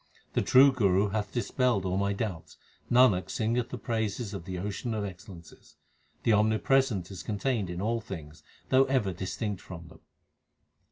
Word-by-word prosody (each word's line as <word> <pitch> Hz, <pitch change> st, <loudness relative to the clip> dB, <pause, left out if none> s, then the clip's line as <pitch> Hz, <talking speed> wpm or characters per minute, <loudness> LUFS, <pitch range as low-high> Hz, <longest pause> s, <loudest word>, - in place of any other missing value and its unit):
The -, -, +2 dB
true 135 Hz, +2 st, +6 dB
Guru 100 Hz, -5 st, +2 dB
hath 105 Hz, -1 st, -2 dB
dispelled 120 Hz, -4 st, 0 dB
all 90 Hz, 0 st, -1 dB
my 100 Hz, +1 st, +1 dB
doubts; 90 Hz, -7 st, -5 dB, 0.3 s
Nanak 115 Hz, -8 st, +4 dB
singeth 115 Hz, +2 st, -1 dB
the 125 Hz, -, -5 dB
praises 110 Hz, -1 st, -2 dB
of 95 Hz, -4 st, -6 dB
the 95 Hz, -1 st, -5 dB
Ocean 105 Hz, +5 st, -3 dB
of 105 Hz, -1 st, -2 dB
excellences. 90 Hz, -3 st, -12 dB, 0.5 s
The 115 Hz, -, +3 dB
Omnipresent 110 Hz, -1 st, +2 dB
is 95 Hz, -, -7 dB
contained 105 Hz, -2 st, -2 dB
in 90 Hz, +2 st, -4 dB
all 115 Hz, +2 st, 0 dB
things 80 Hz, -7 st, -9 dB, 0.3 s
though 130 Hz, +1 st, +5 dB
ever 130 Hz, -8 st, 0 dB
distinct 95 Hz, +2 st, -4 dB
from 85 Hz, -2 st, -10 dB
them. -, -, -16 dB
105 Hz, 160 wpm, -29 LUFS, 95-115 Hz, 0.5 s, true